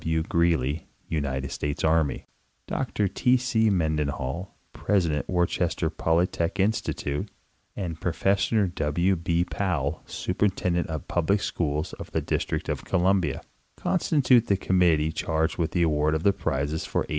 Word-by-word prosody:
W. 80 0 0
Greely, 80 -4 +1 0.2
United 70 -4 -2
States 75 0 -3
Army, 80 -2 +1 0.4
Dr 105 - -1
T. 125 +6 +3
C. 115 -3 +2
Menden 80 -6 +1
hall, 70 +7 -5 0.2
President 85 -8 0
Worcester 85 -2 0
Polytechnic 85 +3 0
Institute, 95 -8 -1 0.5
and 85 -5 -5
Professor 100 +4 +1
W. 85 +2 0
B. 85 0 0
Powell, 80 -8 -2
Superintendent 90 -2 0
of 80 -3 -5
Public 90 +4 +1
Schools 75 -5 -2
of - - -8
the - - +1
District - - -2
of - - -3
Columbia, 90 -5 +1 0.4
constitute 135 - +3
the 100 - +3
committee 85 -5 +2
charged 80 +1 -1
with 80 - +1
the 90 -1 +1
award 75 -1 +2
of 80 - -2
the 100 - +4
prizes 70 +1 -2
for - - -1
1895. - - -4
85 Hz, 140 wpm, -26 LUFS, 75-95 Hz, 0.5 s, the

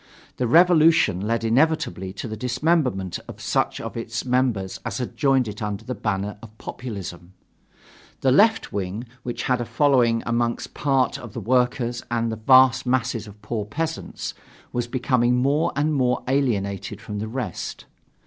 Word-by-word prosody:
The 125 - 0
revolution 160 - +5
led 115 0 0
inevitably 115 - +1
to - - -6
the 110 - -5
dismemberment 125 - 0
of - - -9
such - - 0
of - - -6
its 115 +1 -4
members 125 -7 0
as - - -3
had 125 -2 -4
joined 135 -4 +2
it 105 +1 -7
under 105 +1 -4
the 125 - -3
banner 105 -2 -3
of 110 -1 -13
populism. 95 -7 -7 0.9
The 130 - +3
left 220 - +4
wing, 100 +3 -3 0.2
which 120 0 -4
had 125 -1 +1
a - - -2
following 120 -5 +3
among 120 0 +1 0.2
part 135 -3 +1
of 120 - -10
the - - -4
workers 125 -1 +1
and 115 -1 0
the - - -2
vast 130 +3 +5
masses 120 -3 0
of 105 0 -14
poor 110 -1 -2
peasants, 160 +10 -4 0.4
was 120 -1 -1
becoming 125 -1 +2
more 140 +5 +2
and 150 +1 +1
more 125 -3 +1
alienated 110 -8 -1
from 105 -1 -6
the 110 - -3
rest. 125 +3 -5
120 Hz, 160 wpm, -23 LUFS, 110-130 Hz, 0.9 s, revolution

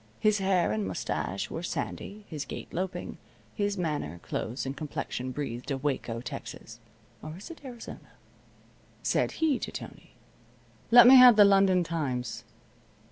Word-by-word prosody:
His 215 -1 +3
hair 190 - +2
and 105 -2 -1
mustache 95 +1 -3
were 165 - -4
sandy, 200 +4 -5
his 150 -4 -5
gait - - -8
loping. 185 +2 -4 0.3
His 205 -1 -1
manner, 150 - -3
clothes, 120 +5 -4
and 135 +1 -4
complexion 140 -4 -5
breathed 130 -1 -5
of 135 -1 -3
Waco, 125 -5 -2
Texas 115 -2 -8 0.4
(or 155 +2 -8
is 205 - -10
it 330 - -12
Arizona?) 245 -4 -10 0.9
Said - - +1
he 315 -5 +1
to - - -5
Tony: - - -10 0.8
"Let 240 0 +9
me 260 +2 +10
have 250 -2 +9
the 205 -1 +8
London 195 -2 +4
Times." 140 -8 -3
165 Hz, 145 wpm, -28 LUFS, 125-205 Hz, 0.9 s, me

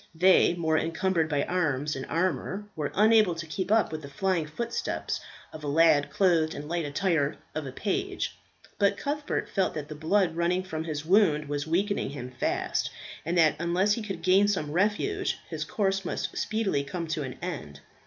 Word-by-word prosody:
They, 180 +1 +5
more 160 -2 +1
encumbered 165 0 0
by 145 -2 +1
arms 150 -5 0
and 135 - -5
armour, 185 +4 -1
were 150 -3 -2
unable 215 -3 +5
to 170 +1 -5
keep 185 +5 -3
up 220 -5 +3
with 155 -1 -4
the 140 - -9
flying 170 +2 0
footsteps 235 +10 -3 0.3
of 155 - -9
a - - -3
lad 150 -1 +4
clothed 170 -5 +2
in - - -5
the - - -9
light 170 0 -1
attire 150 -1 0 0.2
of 155 -3 -4
a - - -5
page; 220 - -2 0.4
but 200 -1 +3
Cuthbert 290 +1 -2
felt 190 -2 0
that 150 -1 -5
the - - -5
blood 165 +3 +1
running 175 +2 +1
from 160 -3 -4
his 155 -2 -4
wound 160 -5 +4
was 145 +1 -3
weakening 195 +4 0
him 125 -3 -7
fast, 125 - -1 0.4
and 175 +1 0
that 155 -3 +5
unless 180 +4 +2
he 230 - -2
could 195 -6 -6
gain 190 +3 +5
some 185 -8 -1
refuge 215 - 0
his - - -4
course 195 -2 0
must - - -3
speedily 210 -10 0
come 170 +4 -4
to 155 -1 -2
an 130 -3 -5
end. 105 - -6
170 Hz, 190 wpm, -28 LUFS, 150-195 Hz, 0.4 s, They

